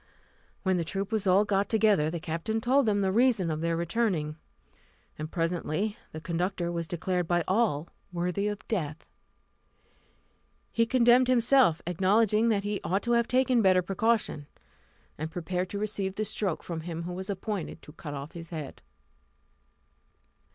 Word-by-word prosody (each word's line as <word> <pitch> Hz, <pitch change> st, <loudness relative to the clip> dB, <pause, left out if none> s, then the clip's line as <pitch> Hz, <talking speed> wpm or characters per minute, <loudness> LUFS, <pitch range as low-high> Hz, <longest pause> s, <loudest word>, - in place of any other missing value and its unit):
When 190 Hz, -2 st, +2 dB
the 170 Hz, -, 0 dB
troop 195 Hz, +5 st, -3 dB
was 215 Hz, -3 st, 0 dB
all 190 Hz, +3 st, +5 dB
got 200 Hz, -1 st, +1 dB
together, 210 Hz, -9 st, +3 dB
the 170 Hz, +1 st, -4 dB
captain 165 Hz, +8 st, -2 dB
told 255 Hz, +2 st, +3 dB
them 205 Hz, -1 st, +2 dB
the 190 Hz, -1 st, +1 dB
reason 220 Hz, -6 st, +3 dB
of 155 Hz, 0 st, -3 dB
their 165 Hz, 0 st, 0 dB
returning; 170 Hz, -4 st, 0 dB, 0.8 s
and 155 Hz, 0 st, -6 dB
presently 175 Hz, +4 st, -1 dB, 0.2 s
the 155 Hz, -, -6 dB
conductor 175 Hz, +2 st, -2 dB
was 170 Hz, -1 st, -3 dB
declared 180 Hz, 0 st, -1 dB
by 175 Hz, 0 st, +2 dB
all 185 Hz, -7 st, +1 dB, 0.2 s
worthy 180 Hz, +3 st, -1 dB
of 210 Hz, 0 st, -5 dB
death. 160 Hz, -8 st, -3 dB, 1.7 s
He 230 Hz, 0 st, +2 dB
condemned 245 Hz, +1 st, +5 dB
himself, 245 Hz, -, +4 dB
acknowledging 210 Hz, +5 st, +3 dB
that 205 Hz, -3 st, +1 dB
he 205 Hz, 0 st, -2 dB
ought 190 Hz, +5 st, 0 dB
to 240 Hz, -, -1 dB
have 235 Hz, -1 st, +3 dB
taken 255 Hz, -1 st, +3 dB
better 185 Hz, -2 st, +4 dB
precaution, 195 Hz, -6 st, 0 dB, 0.7 s
and 160 Hz, +1 st, -3 dB
prepared 180 Hz, +2 st, -3 dB
to 205 Hz, -, -4 dB
receive 200 Hz, -2 st, -2 dB
the 215 Hz, -, -1 dB
stroke 200 Hz, -4 st, -2 dB
from 165 Hz, -2 st, -5 dB
him 165 Hz, 0 st, -5 dB
who 180 Hz, +1 st, -5 dB
was 190 Hz, +2 st, -6 dB
appointed 195 Hz, -4 st, -4 dB
to 150 Hz, -, -13 dB
cut 150 Hz, -3 st, -7 dB
off 140 Hz, +2 st, -7 dB
his 165 Hz, -2 st, -9 dB
head. 155 Hz, -5 st, -7 dB
190 Hz, 160 wpm, -28 LUFS, 165-215 Hz, 1.7 s, all